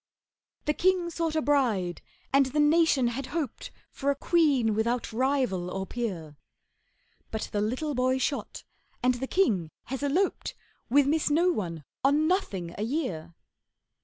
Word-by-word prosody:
The 300 - +2
king 360 0 +2
sought 330 -1 -2
a 315 - +1
bride, 235 -11 +1 0.3
and 275 -1 +5
the 290 +3 -1
nation 295 -4 +4
had 255 +3 -4
hoped 290 -8 -4 0.2
For 280 - -2
a 280 - +2
queen 280 -8 +2
without 235 +2 -1
rival 250 -8 0
or 190 +1 -3
peer. 180 -11 -5 0.9
But 220 - -4
the 205 - 0
little 255 +8 -1
boy 255 0 +2
shot, 275 +2 -3 0.4
and 250 0 +4
the 255 +2 -4
king 210 - +1
has 265 +1 -5
eloped 325 +7 0 0.3
With 280 +3 +5
Miss 305 +2 +1
No 335 +5 +3
one 170 - -4 0.2
on 290 +3 +3
Nothing 195 - -1
a - - 0
year. 205 - -3
265 Hz, 150 wpm, -28 LUFS, 215-300 Hz, 0.9 s, and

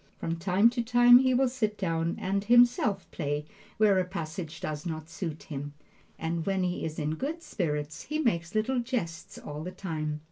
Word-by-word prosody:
From 165 0 -3
time 190 +6 +4
to 240 -1 -1
time 245 +1 +7
he 260 -1 +3
will 265 +1 +4
sit 220 -4 -1
down 165 -3 -1
and 195 +1 -1
himself 240 -3 +4
play 145 +1 -2 0.3
where 205 -3 +4
a - - +2
passage 165 -3 -6
does 150 -1 -4
not 160 -3 -5
suit 165 -3 -5
him, 145 -1 -6 0.4
and 165 0 -2
when 195 0 0
he 180 0 -2
is 155 -1 -4
in 150 0 -1
good 305 - -4
spirits 150 - -3
he 305 - -3
makes 195 - 0
little 245 +4 +1
jests 235 -10 -4
all 150 +1 -7
the 180 - -4
time. 155 -5 -4
180 Hz, 185 wpm, -29 LUFS, 160-235 Hz, 0.4 s, time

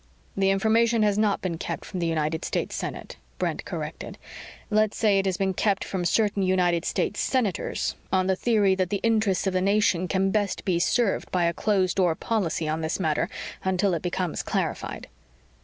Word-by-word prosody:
"The 195 0 +2
information 220 +3 +3
has 205 -1 +3
not 210 -2 +1
been 170 -3 -2
kept - - -4
from 185 - -5
the 170 - 0
United 160 0 -1
States - - -2
Senate," - - -6 0.2
Brent - - -2
corrected. - - -6 0.5
"Let's 215 0 +2
say 205 -3 +3
it 195 - 0
has 185 -2 0
been 190 -1 0
kept 195 +1 +1
from 185 -2 -3
certain 205 +2 +2
United 180 -3 +2
States 210 - -1
Senators 225 -9 0 0.2
on 185 -1 +2
the 190 0 +2
theory 205 -2 +2
that 185 -1 0
the 200 - -1
interests 220 -5 +2
of 190 - 0
the 185 - +1
nation 195 -2 +2
can 195 0 +1
best 205 -2 -1
be 180 -3 +1
served 215 +3 +1
by 180 -1 +1
a 170 0 +2
closed 190 -3 +1
door 175 -4 +3
policy 170 -6 -1
on 155 +1 -1
this 160 +3 -2
matter 155 -5 0 0.3
until 190 0 +1
it 170 - -1
becomes 180 -2 -2
clarified." - - -3
190 Hz, 190 wpm, -26 LUFS, 180-210 Hz, 0.5 s, information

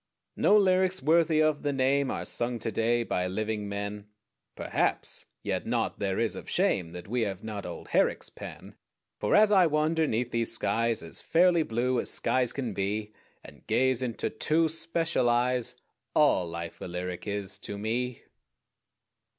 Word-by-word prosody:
No 210 - +5
lyrics 185 -2 +3
worthy 160 +2 +3
of 155 -1 +1
the 145 - 0
name 135 0 +2
Are - - -3
sung 120 0 -1
to 115 - -3
day 115 +2 +1
by 90 -5 -1
living 105 +2 -3
men? 100 +1 -5 0.5
Perhaps! - - -1 0.2
Yet - - -2
naught - - 0
is - - -31 0.4
there - - -6
of - - -13
shame 85 -3 +1
That 90 +1 -9
we 120 +3 -1
have 100 -3 -3
not 105 -2 -5
old - - -8
Herrick's - - +1
pen, - - -10 0.5
For 105 - +2
as 210 0 +6
I 190 -4 +6
wander 155 +1 +1
'neath 120 +1 -1
these 115 -1 0
skies 115 -4 0
As 80 - -5
fairly 170 0 +4
blue 125 -1 0
as - - -2
skies 125 -2 +1
can 125 -6 -3
be 105 +2 -2 0.3
And - - -15
gaze 130 0 +2
into 120 -3 -2
two 160 +1 +2
special 165 -5 0
eyes, 125 0 +1 0.4
All 90 - +4
life 85 0 -7
a - - -4
lyric 90 +2 -5
is 100 -2 -3
to 100 - -6
me. 120 +4 -2
120 Hz, 165 wpm, -28 LUFS, 105-155 Hz, 0.5 s, as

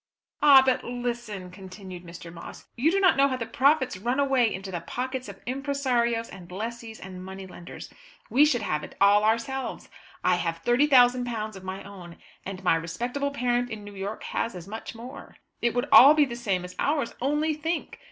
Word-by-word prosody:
"Ah, 280 -3 +8
but 260 -1 +1
listen!" 240 -6 -5
continued 185 -1 -10
Mr. 170 -1 -10
Moss. 170 - -10
"You 260 +6 +2
do 390 +4 +2
not 380 -1 +5
know 275 +1 +4
how 260 -2 -2
the 230 - -4
profits 260 0 +2
run 240 +6 -1
away 265 -5 +3
into 190 +1 -6
the 175 -2 -4
pockets 255 +7 -4
of - - -10
impresarios 250 -4 0
and 180 -2 -12
lessees 225 +3 -6
and 185 -1 -9
money 190 +1 -8
lenders. 175 -2 -11 0.3
We 275 +4 +4
should 250 -7 +2
have 150 -5 -1
it - - -10
all 205 +1 +5
ourselves. 230 +5 -1 0.3
I 180 -1 +3
have 165 -1 -3
£30,000 245 -4 +3
of 190 - -11
my 190 +1 -6
own, 180 -4 -11 0.3
and 190 -1 -7
my 180 - +4
respectable 240 +13 -3
parent 245 -3 0
in 220 -2 -7
New 205 0 -10
York 200 +2 -5
has 230 - -3
as 180 0 -9
much 220 +2 -7
more. 245 +4 -10 0.3
It 235 -1 +1
would 245 +3 0
all 285 +4 +9
be 300 -1 +5
the 240 -3 -6
same 195 -7 -2
as 180 - -10
ours. 285 -5 0
Only 295 +4 +1
think! 320 +2 -4
235 Hz, 190 wpm, -26 LUFS, 190-260 Hz, 0.3 s, all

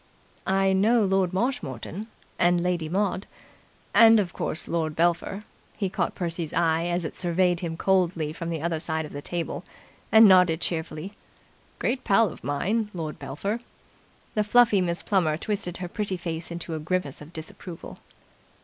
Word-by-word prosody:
"I 195 0 +3
know 220 +4 +4
Lord 190 -2 +2
Marshmoreton. 190 - -3 0.3
And 175 0 +3
Lady 175 -3 -1
Maud. 195 +1 -1 0.7
And, 225 -1 +8
of 180 -4 -1
course, 160 - -3
Lord 160 -2 -1
Belpher." 175 +4 0 0.3
He 195 -4 -1
caught - - -1
Percy's 170 -3 -3
eye 165 0 +2
as 175 -1 -1
it - - -5
surveyed 180 0 +1
him 165 -2 -4
coldly 175 -5 +1
from 170 +1 -5
the 160 -2 -3
other 170 -2 0
side 160 0 -1
of 150 - -10
the 145 - -5
table, 170 +2 -4 0.5
and 220 0 +9
nodded 180 -4 +5
cheerfully. 165 +2 -3 0.6
"Great 255 +2 -1
pal 205 +1 +4
of - - -12
mine, 205 +10 0
Lord 155 -3 -5
Belpher." 195 - -3 0.7
The 210 - +1
fluffy 215 -2 +5
Miss 170 -1 -2
Plummer 170 -7 +1
twisted 180 -2 -2
her 180 - -5
pretty 195 0 -3
face 170 -1 -5
into 170 -1 -5
a 160 - -3
grimace 155 -3 -2
of 150 +2 -11
disapproval. 165 +1 -9
175 Hz, 160 wpm, -26 LUFS, 165-195 Hz, 0.7 s, and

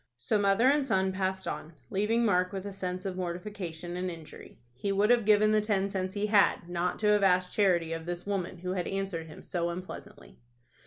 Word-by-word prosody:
So 170 - 0
mother 200 +4 +4
and 285 +1 +4
son 190 -4 +2
passed 190 0 -2
on, 155 +2 -5 0.2
leaving 220 +4 +1
Mark 180 -3 +2
with 195 -1 -5
a 200 - -5
sense 185 -1 -4
of 190 -2 -3
mortification 175 -2 -5
and 180 +1 -2
injury. 165 -3 -10 0.2
He 165 +11 -3
would 205 +3 +3
have 240 -3 +4
given 215 0 +5
the 215 0 +4
ten 200 -2 0
cents 190 0 -3
he 205 +1 0
had, 205 -4 +3
not 175 0 -1
to 210 - +2
have 210 0 +4
asked 185 -1 +3
charity 175 -5 +2
of 165 0 -6
this 175 0 -4
woman 195 -3 -2
who 180 +1 -4
had 180 -2 -2
answered 195 -4 -3
him 155 - -12
so 170 -1 -2
unpleasantly. 185 +4 -9
190 Hz, 210 wpm, -29 LUFS, 175-205 Hz, 0.2 s, given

